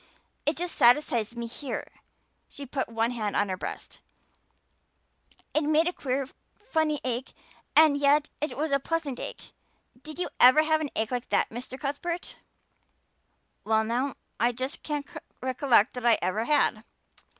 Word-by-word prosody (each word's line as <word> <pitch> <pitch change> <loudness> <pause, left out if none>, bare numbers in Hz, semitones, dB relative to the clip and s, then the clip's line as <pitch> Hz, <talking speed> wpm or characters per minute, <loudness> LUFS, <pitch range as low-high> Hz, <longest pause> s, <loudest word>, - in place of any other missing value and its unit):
It 300 - +1
just 350 +1 -2
satisfies 240 -3 +3
me 235 0 -4
here" 255 +4 -5 0.6
she 285 - -8
put 265 -1 -3
one 230 +1 0
hand 215 -4 -3
on 205 - +1
her 185 - -1
breast - - -7 1.5
"it 310 - +2
made 310 +2 +3
a 355 - 0
queer 265 -2 -2 0.3
funny 315 -7 -1
ache 255 0 -3 0.4
and 310 -2 +7
yet 285 +1 +3
it 300 - -3
was 310 +1 -1
a 275 - +3
pleasant 295 -3 -2
ache. - - -8 0.5
Did 310 +2 -9
you 360 - -2
ever 260 +5 +8
have 315 0 +2
an 300 - -2
ache 220 +1 -1
like 245 -1 -3
that, - - +1
Mr. 250 +3 -7
Cuthbert?" 325 +5 -4 1.3
"Well 220 0 +2
now, 245 +5 -1 0.2
I 240 +2 +2
just 260 +4 -4
can't 295 -2 -3 0.3
recollect 255 -3 +3
that 250 -1 -6
I 230 - +6
ever 195 +6 -1
had." 265 -7 +2
270 Hz, 155 wpm, -27 LUFS, 235-300 Hz, 1.5 s, ever